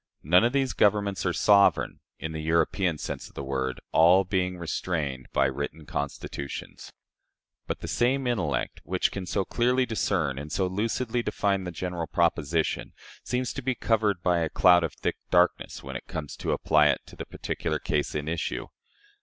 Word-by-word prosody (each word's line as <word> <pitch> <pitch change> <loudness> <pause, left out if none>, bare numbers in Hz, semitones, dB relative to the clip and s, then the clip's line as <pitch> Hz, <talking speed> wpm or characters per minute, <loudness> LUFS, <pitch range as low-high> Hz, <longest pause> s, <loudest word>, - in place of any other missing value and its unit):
None 90 +7 +5
of 120 - +3
these 135 -2 +1
governments 100 -2 +2
are - - +2
sovereign, 100 +2 +4 0.2
in 80 - -5
the 80 -1 -4
European 85 +2 +1
sense - - -5
of - - -24
the 70 - -5
word, 65 -1 -2
all 90 +4 +6
being 90 -1 -1
restrained 80 -6 -3
by 70 - +3
written 70 +3 -3
constitutions." 70 -1 -5 0.8
But - - -4
the - - -5
same 130 +3 +1
intellect, 120 -7 -1
which 90 0 0
can 95 -2 -5
so 95 +2 0
clearly 125 +4 +2
discern 90 - 0
and 75 +1 -7
so 95 - +1
lucidly 115 +5 -1
define 100 -4 0
the 90 - -4
general 85 -1 -4
proposition, 80 +3 0 0.3
seems 125 -1 -2
to 140 - -5
be 130 0 -1
covered 105 -6 +1
by 90 -1 +3
a 80 -1 0
cloud 90 0 +5
of 85 - -2
thick - - -2
darkness 90 0 +2
when - - -7
it - - -6
comes 75 -2 -5
to - - -2
apply 75 -1 +4
it - - +2
to - - -14
the - - -6
particular - - -3
case 75 0 -1
in 75 0 -2
issue. 80 0 -3
90 Hz, 180 wpm, -27 LUFS, 80-105 Hz, 0.8 s, all